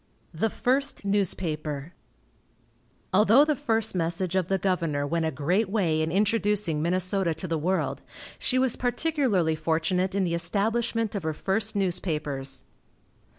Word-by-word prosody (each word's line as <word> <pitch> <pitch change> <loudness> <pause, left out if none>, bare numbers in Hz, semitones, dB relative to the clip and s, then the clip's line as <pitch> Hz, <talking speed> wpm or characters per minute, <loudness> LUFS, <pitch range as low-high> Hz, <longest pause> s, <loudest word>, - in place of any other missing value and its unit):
THE 195 +8 0
FIRST 270 0 -1
NEWSPAPER. 165 -6 -1 1.2
Although 220 +8 +6
the 305 -1 +1
first 225 -3 0
message 170 +1 -1
of 190 -3 +1
the 195 - +1
governor 165 -6 0
went 165 +2 0
a - - -1
great 175 +9 0
way 175 -7 +1
in 160 +1 -1
introducing 205 -4 +1
Minnesota 185 0 0
to 185 - -5
the 165 -2 -1
world, 185 +5 -1 0.4
she 255 - +1
was 255 -2 +2
particularly 245 - +1
fortunate 165 +4 0
in 200 - +2
the 170 -2 -1
establishment 220 +6 0
of 200 - -2
her 160 -1 -3
first 205 +5 -1
newspapers. 155 -8 -2
185 Hz, 140 wpm, -26 LUFS, 160-215 Hz, 1.2 s, Although